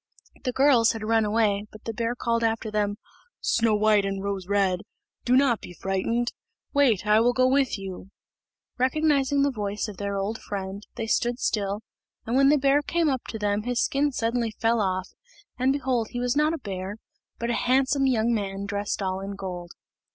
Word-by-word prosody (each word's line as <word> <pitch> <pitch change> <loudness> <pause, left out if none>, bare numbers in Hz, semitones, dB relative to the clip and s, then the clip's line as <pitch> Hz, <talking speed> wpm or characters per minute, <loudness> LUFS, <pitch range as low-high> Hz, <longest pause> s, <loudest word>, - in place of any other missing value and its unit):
The 255 - +1
girls 255 -3 +4
had 225 -1 -6
run 225 0 +2
away, 210 -1 +1
but 215 - -13
the 225 - -4
bear 230 +2 -1
called 230 -1 0
after 225 -1 0
them, 205 -1 0 0.4
"Snow 225 -2 +2
white 210 -1 +4
and 195 0 -3
Rose 200 -2 -3
red, 195 -3 +2 0.5
do 250 - +4
not 260 -5 +3
be 175 - -10
frightened; 230 +7 -1 0.4
wait, 255 -9 +3
I 210 +1 +5
will 240 +2 +3
go 255 +1 +3
with 265 -2 +2
you. 195 -1 -8 0.7
Recognising 280 +1 +2
the 285 - +2
voice 210 -2 -3
of 205 -3 -8
their 200 0 -3
old 200 +3 -3
friend, 195 0 -6
they 230 - -3
stood 240 +2 +1
still, 205 -4 -1 0.4
and 230 - -1
when 275 +1 +5
the 300 - +5
bear 280 +1 +3
came 335 +1 +1
up 260 -3 -2
to 220 - -5
them 205 -1 0
his 245 +2 -1
skin 285 +1 +1
suddenly 235 -1 0
fell 225 +1 +1
off; 185 -1 -1 0.5
and 260 +1 +3
behold 260 -5 0
he 245 - -4
was 245 +1 0
not 305 +2 +2
a - - -5
bear, 195 -4 -5 0.4
but 235 +1 -2
a - - -1
handsome 270 +1 +3
young 235 -2 +2
man 200 -2 -2
dressed 200 0 -2
all 190 0 -1
in 195 +1 -5
gold. 180 -3 -6
225 Hz, 195 wpm, -26 LUFS, 200-255 Hz, 0.7 s, I